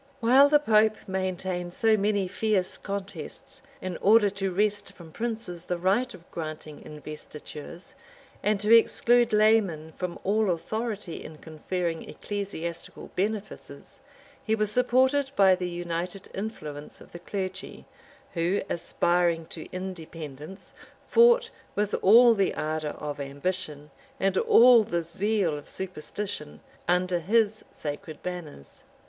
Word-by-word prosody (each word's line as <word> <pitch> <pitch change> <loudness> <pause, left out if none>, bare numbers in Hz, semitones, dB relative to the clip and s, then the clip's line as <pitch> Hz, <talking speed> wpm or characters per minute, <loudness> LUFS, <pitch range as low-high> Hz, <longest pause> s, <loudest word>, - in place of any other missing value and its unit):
While 260 +4 +6
the 295 - +6
pope 220 -6 +3
maintained 185 -2 -3
so 225 -1 +4
many 205 -2 +1
fierce 195 0 0
contests, 195 - -7 0.2
in 185 -2 -3
order 210 0 +5
to 195 -1 -2
wrest 205 +2 0
from 165 -3 -13
princes 220 -5 -4
the 180 - -2
right 200 +8 +1
of 170 -1 -18
granting 155 -2 -6
investitures, 150 +2 -9 0.5
and 210 -1 +1
to 215 +2 +6
exclude 240 +1 +4
laymen 210 -7 +3
from 180 -2 -4
all 210 +1 +2
authority 210 +2 -3
in 155 - -10
conferring 165 +2 -4
ecclesiastical 170 -5 -6
benefices, 210 +2 -4 0.4
he 220 - +1
was 215 -1 0
supported 260 +4 +3
by 195 -1 +6
the 180 -1 -2
united 175 +2 -4
influence 155 -8 -6
of - - -15
the 175 - -9
clergy; 190 +1 -5 0.5
who, 175 +3 0
aspiring 170 -1 +1
to 160 0 -8
independence, 165 -2 -8 0.3
fought, 475 0 +5 0.2
with 205 0 0
all 235 +4 +8
the 200 -3 +1
ardor 155 -1 -2
of 145 -1 -5
ambition, 150 +1 -4 0.3
and 195 0 +1
all 235 +3 +7
the 170 -4 -2
zeal 185 0 0
of 145 - -9
superstition, 185 - -5 0.3
under 180 0 +2
his 215 +4 +1
sacred 150 +1 -7
banners. 175 - -8
185 Hz, 125 wpm, -27 LUFS, 170-215 Hz, 0.5 s, all